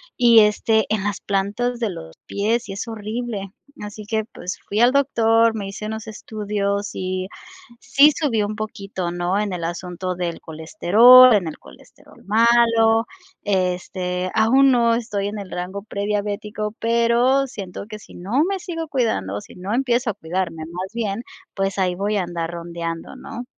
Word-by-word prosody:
y 235 Hz, -2 st, +6 dB
este 215 Hz, +1 st, +2 dB
en 205 Hz, -3 st, -1 dB
las 205 Hz, -1 st, -2 dB
plantas 205 Hz, +5 st, -1 dB
de 225 Hz, -3 st, 0 dB
los 80 Hz, -, -9 dB
pies 220 Hz, +2 st, -1 dB
y 195 Hz, -, -4 dB
es 205 Hz, +4 st, -5 dB
horrible. 215 Hz, -2 st, -5 dB, 0.3 s
Así 210 Hz, +1 st, -7 dB
que 220 Hz, 0 st, -1 dB
pues 180 Hz, -4 st, -7 dB
fui 205 Hz, -, -1 dB
al 245 Hz, -, +6 dB
doctor, 230 Hz, -5 st, +3 dB
me 205 Hz, -2 st, -4 dB
hice 200 Hz, +2 st, -7 dB
unos 220 Hz, +1 st, -5 dB
estudios 205 Hz, -2 st, -3 dB
y 185 Hz, 0 st, -3 dB, 0.5 s
sí 290 Hz, +2 st, +5 dB
subió 240 Hz, -9 st, 0 dB
un 210 Hz, +1 st, -4 dB
poquito, 195 Hz, -5 st, -4 dB
¿no? 175 Hz, +3 st, -1 dB
En 205 Hz, -3 st, -2 dB
el 175 Hz, -, -4 dB
asunto 180 Hz, +2 st, -4 dB
del 175 Hz, -2 st, -4 dB
colesterol, 210 Hz, +10 st, +6 dB
en 190 Hz, -5 st, +2 dB
el 155 Hz, -, -6 dB
colesterol -, -, -18 dB
malo, 225 Hz, +1 st, +4 dB, 0.4 s
este, 180 Hz, -1 st, -1 dB
aún 260 Hz, +5 st, +5 dB
no 235 Hz, -2 st, +3 dB
estoy 210 Hz, -4 st, -2 dB
en 210 Hz, 0 st, -6 dB
el 195 Hz, -, -8 dB
rango 190 Hz, +3 st, -5 dB
prediabético, 210 Hz, +1 st, -3 dB
pero 235 Hz, +4 st, +2 dB
siento 200 Hz, -6 st, -7 dB
que 215 Hz, -, -7 dB
sí -, -, -16 dB
no 220 Hz, -, 0 dB
me 385 Hz, +1 st, -1 dB
sigo 330 Hz, -4 st, -5 dB
cuidando, 100 Hz, -, -1 dB
sí -, -, -15 dB
no 190 Hz, +4 st, -4 dB
empiezo 245 Hz, -1 st, +1 dB
a -, -, -9 dB
cuidarme 165 Hz, -1 st, -3 dB
más 180 Hz, +3 st, -6 dB
bien, 225 Hz, -1 st, -3 dB, 0.3 s
pues 195 Hz, 0 st, -2 dB
ahí 180 Hz, -2 st, +1 dB
voy 205 Hz, +2 st, -1 dB
a 185 Hz, -, +1 dB
andar 170 Hz, -1 st, -4 dB
rondeando, 170 Hz, -1 st, -6 dB
¿no? 245 Hz, +1 st, -8 dB
210 Hz, 170 wpm, -21 LUFS, 185-230 Hz, 0.5 s, y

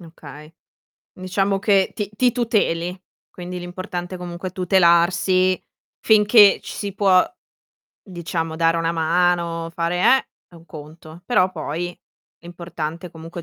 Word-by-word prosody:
Okay. 155 Hz, -2 st, -13 dB, 0.6 s
Diciamo 195 Hz, +2 st, -1 dB
che 200 Hz, -2 st, +2 dB
ti 205 Hz, -2 st, -4 dB
ti 250 Hz, +2 st, +2 dB
tuteli, 190 Hz, -7 st, -1 dB, 0.3 s
quindi 180 Hz, 0 st, -7 dB
l'importante 175 Hz, 0 st, -6 dB
comunque 180 Hz, +1 st, -6 dB
è -, -, -13 dB
tutelarsi, 185 Hz, 0 st, +2 dB, 0.4 s
finché 210 Hz, -1 st, +5 dB
ci -, -, -8 dB
si 200 Hz, -2 st, -5 dB
può 190 Hz, -3 st, +4 dB, 0.8 s
diciamo 165 Hz, -3 st, -4 dB
dare 165 Hz, 0 st, +2 dB
una 165 Hz, 0 st, -1 dB
mano, 170 Hz, 0 st, 0 dB
fare, 170 Hz, +1 st, -2 dB
eh, 265 Hz, +8 st, +4 dB, 0.2 s
è, 175 Hz, -, -21 dB
un 165 Hz, 0 st, -16 dB
conto, 155 Hz, +2 st, -12 dB
però 185 Hz, -4 st, +2 dB
poi 165 Hz, +1 st, -4 dB, 0.5 s
è -, -, -29 dB
importante 170 Hz, 0 st, -7 dB
comunque 165 Hz, +1 st, -9 dB
175 Hz, 130 wpm, -21 LUFS, 165-185 Hz, 0.8 s, finché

